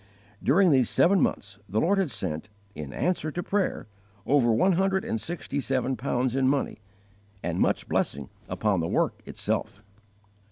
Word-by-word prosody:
During 175 +6 +4
these 130 -4 +4
seven 185 +2 +4
months 100 0 -1
the 105 +4 +1
Lord 195 - +2
had 190 -6 +1
sent, 95 -5 -4 0.2
in 75 -2 -7
answer 170 - -1
to 175 +3 -4
prayer, 200 +1 -1 0.4
over 135 -4 +3
one 125 - +4
hundred 190 +1 +1
and 110 - -2
sixty 160 0 -4
seven 130 -1 0
pounds 125 +1 -1
in 135 -1 +2
money, 140 -4 0 0.6
and - - -2
much - - +1
blessing 70 -1 -1 0.2
upon 105 -4 +1
the 85 - -1
work - - 0
itself. 100 - -3
130 Hz, 160 wpm, -27 LUFS, 105-175 Hz, 0.6 s, During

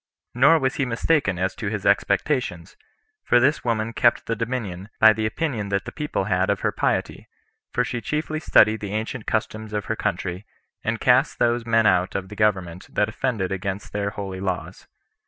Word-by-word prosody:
Nor 140 +7 +5
was 130 -4 -1
he 140 - +1
mistaken 120 - +1
as 95 +2 -1
to 110 - -5
his 100 -1 -3
expectations; 100 - 0 0.5
for 120 - +4
this 140 +5 +2
woman 115 -1 -1
kept 120 +1 +2
the 115 - -1
dominion, 110 -5 -4
by 110 0 +8
the 110 0 -1
opinion 110 -5 -2
that 100 -1 -1
the - - -6
people 150 -9 -2
had 95 -1 +1
of 100 -1 0
her - - +1
piety; - - -2 0.4
for 125 - +1
she 125 -1 -4
chiefly 155 +2 -2
studied 110 -8 +4
the 100 -1 -5
ancient 110 +1 -4
customs 110 0 -2
of 105 -1 -2
her - - -2
country, 90 +3 -3 0.4
and 115 +1 -1
cast 130 +4 +3
those 120 0 +1
men 115 -1 +3
out 90 -2 +2
of 95 -1 -3
the 105 - -9
government 95 -5 0
that - - +1
offended 110 -8 -2
against 95 +1 -4
their 100 0 -1
holy 95 -2 -6
laws. 95 -2 -4
110 Hz, 190 wpm, -23 LUFS, 95-120 Hz, 0.5 s, by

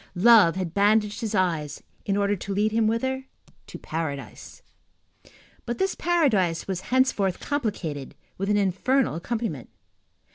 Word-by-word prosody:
Love 205 -3 +6
had 185 -3 -3
bandaged 210 +2 +2
his 220 -2 -2
eyes, 165 -6 -1 0.2
in 200 0 +1
order 200 0 +1
to 195 +1 -5
lead 210 +2 +1
him 225 0 +2
whither? 260 +4 -1 0.4
To - - -8
paradise. 145 -7 -6 1.0
But 240 - -4
this 385 0 0
paradise 220 - +1
was 190 -2 -3
henceforth 245 -8 +1
complicated 190 - -3 0.2
with 195 +1 -3
an 210 - +3
infernal 205 - +1
accompaniment. 180 - -4
205 Hz, 135 wpm, -25 LUFS, 175-230 Hz, 1.0 s, Love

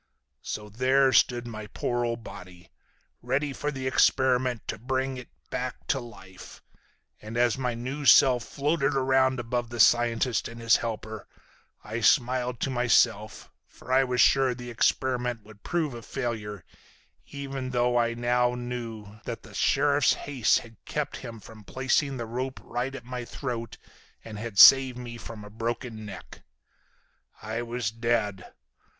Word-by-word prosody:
"So 105 0 -5
there 130 +5 +2
stood 120 -1 +3
my 110 -2 -7
poor 120 +3 -2
old 115 -1 -3
body. 90 -4 -12 0.5
Ready 135 +3 -1
for 145 - -3
the 135 -3 -5
experiment 130 -2 +2
to 110 - -3
bring 130 +2 -2
it 125 - -10 0.2
back 125 0 -4
to 135 - +2
life. 95 -6 -12 0.6
And 110 +2 -7
as 120 -2 +3
my 125 -2 -2
new 130 +5 -5
self 125 -3 +6
floated 145 +2 0
around 130 -1 +2
above 120 0 -2
the 120 0 -7
scientist 120 +1 +3
and 115 0 -10
his 115 -1 +4
helper 110 -2 -6 0.6
I 110 +2 -5
smiled 125 0 +2
to 135 - -1
myself, 115 -4 +1 0.2
for - - -11
I 135 +1 +5
was 125 -1 -2
sure 135 -1 +4
the 120 0 -8
experiment 125 0 0
would 105 -1 -16
prove 160 -5 -1
a 120 - -8
failure, 110 -6 -5 0.6
even 135 -2 -5
though 120 -1 +1
I 115 -1 +2
now 120 +1 +1
knew 115 -4 -6
that - - -6
the - - -14
sheriff's - - +3
haste 135 -6 +1
had 115 -1 -16
kept 150 -1 -3
him 115 -3 -9
from 110 +1 -14
placing 135 +4 0
the 120 - -4
rope 130 +3 -4
right 125 +3 -3
at 120 - -9
my 125 0 -5
throat 120 -1 -5 0.5
and 110 -2 -8
had 110 -2 -6
saved 130 +3 +8
me 120 -1 -8
a 105 -3 -9
broken 115 0 -4
neck. 100 - -10 1.0
I 110 +2 -4
was 120 -2 -3
dead. 115 -4 -1
120 Hz, 155 wpm, -27 LUFS, 115-130 Hz, 1.0 s, saved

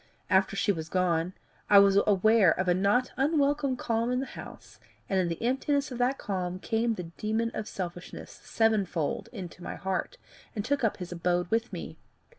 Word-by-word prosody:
After 190 +1 +3
she 205 +1 +2
was 160 -4 -5
gone, 180 -1 +1 0.4
I 205 - +8
was 200 -1 +7
aware 205 -2 +4
of 185 - 0
a 180 - +4
not 200 +7 +2
unwelcome 280 -1 +1
calm 230 +1 0
in 250 - +1
the 270 - -2
house, - - -11 0.3
and 190 - +1
in 180 - +1
the 165 -1 -3
emptiness 275 +3 0
of 250 - -6
that 255 +2 +2
calm 185 -2 -3
came 225 +3 0
the 180 - -5 0.2
demon 220 +2 0
of 215 - -4
selfishness 175 -1 -7
sevenfold 200 -8 0
into 185 -6 -8
my - - -5
heart, 190 - -3 0.4
and 205 -1 -3
took 280 0 0
up 225 - +1
his 180 -2 -7
abode 175 0 -1
with 225 +1 0
me. - - -7
205 Hz, 185 wpm, -28 LUFS, 180-240 Hz, 0.4 s, I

